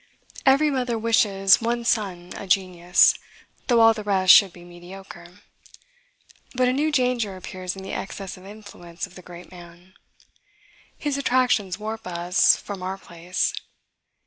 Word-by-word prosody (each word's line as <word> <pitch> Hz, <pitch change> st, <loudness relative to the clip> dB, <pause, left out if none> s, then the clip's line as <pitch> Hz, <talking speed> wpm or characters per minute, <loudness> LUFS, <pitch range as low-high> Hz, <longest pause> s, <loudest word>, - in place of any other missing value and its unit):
Every 285 Hz, +3 st, +4 dB
mother 250 Hz, -3 st, -2 dB
wishes 205 Hz, -4 st, +3 dB
one 235 Hz, +1 st, -2 dB
son 185 Hz, -6 st, -2 dB
a 200 Hz, -, -8 dB
genius, 180 Hz, -2 st, +3 dB, 0.5 s
though 235 Hz, -2 st, +3 dB
all 225 Hz, 0 st, +6 dB
the 215 Hz, -1 st, -7 dB
rest 190 Hz, -3 st, +5 dB
should 195 Hz, -1 st, +6 dB
be 175 Hz, 0 st, -15 dB
mediocre. 175 Hz, +1 st, -13 dB, 1.1 s
But 255 Hz, 0 st, +2 dB
a 250 Hz, -, +1 dB
new 300 Hz, +4 st, 0 dB
danger 250 Hz, -7 st, 0 dB
appears 185 Hz, 0 st, -7 dB
in 190 Hz, -, -10 dB
the 190 Hz, -, -7 dB
excess 195 Hz, -1 st, -6 dB
of 185 Hz, -, -16 dB
influence 195 Hz, -4 st, -10 dB
of -, -, -18 dB
the 185 Hz, -, -12 dB
great 175 Hz, 0 st, -13 dB
man. 175 Hz, +1 st, -15 dB, 1.0 s
His 285 Hz, -2 st, -3 dB
attractions 245 Hz, -8 st, +1 dB
warp 220 Hz, -1 st, -7 dB
us 175 Hz, +1 st, +2 dB
from 200 Hz, -2 st, -8 dB
our 190 Hz, +1 st, -4 dB
place. 175 Hz, -1 st, -3 dB
195 Hz, 145 wpm, -23 LUFS, 180-230 Hz, 1.1 s, all